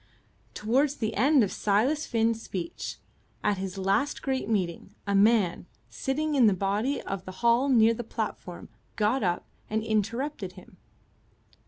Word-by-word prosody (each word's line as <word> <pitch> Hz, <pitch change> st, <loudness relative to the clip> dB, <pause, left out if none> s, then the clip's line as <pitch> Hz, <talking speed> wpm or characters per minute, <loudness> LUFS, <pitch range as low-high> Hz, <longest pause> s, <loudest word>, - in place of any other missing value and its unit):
Towards 265 Hz, +7 st, +1 dB
the 220 Hz, -5 st, -2 dB
end 270 Hz, +4 st, +4 dB
of 200 Hz, -, -1 dB
Silas 245 Hz, +10 st, +1 dB
Finn's 225 Hz, 0 st, +1 dB
speech, 175 Hz, -6 st, -5 dB, 0.5 s
at 205 Hz, -2 st, +1 dB
his 190 Hz, 0 st, -5 dB
last 195 Hz, +10 st, 0 dB
great 265 Hz, -5 st, -1 dB
meeting, 185 Hz, -6 st, -2 dB
a 200 Hz, -, -1 dB
man, 200 Hz, -4 st, +3 dB, 0.2 s
sitting 300 Hz, +3 st, -2 dB
in 255 Hz, -5 st, +5 dB
the 200 Hz, -, +3 dB
body 205 Hz, +9 st, 0 dB
of 195 Hz, -1 st, -4 dB
the 185 Hz, -, -6 dB
hall 235 Hz, +4 st, +4 dB
near 230 Hz, -3 st, +5 dB
the 240 Hz, -, -5 dB
platform, 215 Hz, -5 st, -5 dB, 0.3 s
got 220 Hz, +5 st, +1 dB
up 175 Hz, -3 st, 0 dB, 0.2 s
and 220 Hz, 0 st, -1 dB
interrupted 220 Hz, 0 st, -2 dB
him. 185 Hz, -1 st, -15 dB
220 Hz, 150 wpm, -27 LUFS, 195-260 Hz, 0.5 s, in